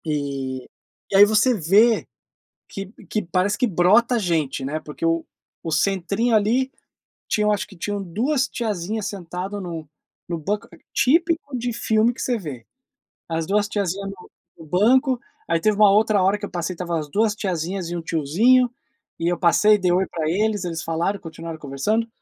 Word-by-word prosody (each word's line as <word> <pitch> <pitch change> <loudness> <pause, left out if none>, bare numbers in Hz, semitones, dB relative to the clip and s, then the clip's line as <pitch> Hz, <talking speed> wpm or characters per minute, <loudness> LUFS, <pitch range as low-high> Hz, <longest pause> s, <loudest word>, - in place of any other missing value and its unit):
E 140 -4 -3 0.4
e - - 0
aí 205 - +10
você 220 +4 +3
vê 210 +5 +3 0.6
que 195 - -6
p 195 - -17
que 215 - -1
parece 185 +4 0
que - - +2
brota 215 +6 +3
gente, 160 -8 -1
né, 150 +3 -2
porque 155 +1 -6
o 165 0 +1 0.4
o 165 - -2
centrinho, 200 +7 +1
ali, 235 +5 +2 0.6
tinham 210 0 +2
eu - - +4
acho 205 - -2
que 200 -2 -15
tinham 205 +3 -3
2 250 - 0
tiazinhas 215 -2 -3
sentado 195 0 -5
no 165 -4 -6 0.4
no 170 - -2
banco 200 +7 -3 0.2
típico 325 0 +2
de 240 0 -2
filme 220 +1 +2
que 245 - -11
você 245 - 0
vê. 140 - -8 0.6
As 165 -1 -2
2 205 +1 +2
tiazinha 200 -2 -2
no 195 -2 -9 0.3
no 165 - -12
banco, 245 - +3 0.3
aí 165 0 +2
teve 210 +5 +2
uma 205 -1 +6
outra 210 0 +3
hora 195 +2 +3
que 205 - -5
eu - - -9
passei, 175 0 -3
estava 170 -1 -2
as 150 -1 -6
2 215 +6 +2
tiazinhas 180 -2 -3
e 175 - -4
1 - - -4
tiozinho, 190 - +3 0.5
e 165 - -1
eu 175 0 +1
passei, 210 +4 +5
dei 180 -2 +2
oi 185 +2 +2
para 155 -2 -2
eles, 205 +3 0
eles 165 -3 -4
falaram, 170 +5 -1
continuaram 165 0 -8
conversando, 155 +12 -1
195 Hz, 180 wpm, -22 LUFS, 165-215 Hz, 0.6 s, aí